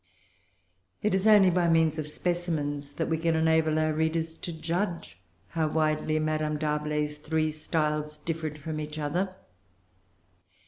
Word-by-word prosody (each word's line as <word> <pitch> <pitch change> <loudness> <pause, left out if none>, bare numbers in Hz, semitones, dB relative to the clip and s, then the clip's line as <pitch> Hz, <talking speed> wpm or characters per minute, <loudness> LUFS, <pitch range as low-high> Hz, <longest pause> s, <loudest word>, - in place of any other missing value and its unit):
It 210 - +2
is 190 +2 +2
only 205 -4 +7
by 175 0 +2
means 160 -1 +3
of 150 - -3
specimens 150 -4 -2
that 165 - -2
we 160 -1 0
can 165 0 +1
enable[Pg 160 0 +3
390] 155 0 +1
our 155 - +1
readers 160 +1 0
to 170 - -7
judge 165 - -3 0.3
how 160 -2 0
widely 155 0 +1
Madame 155 -1 0
D'Arblay's 150 0 -1
three 155 +1 0
styles 150 -1 -1
differed 155 -1 -4
from 155 +1 -5
each 150 0 -5
other. 175 +6 -1
155 Hz, 145 wpm, -28 LUFS, 150-165 Hz, 0.3 s, only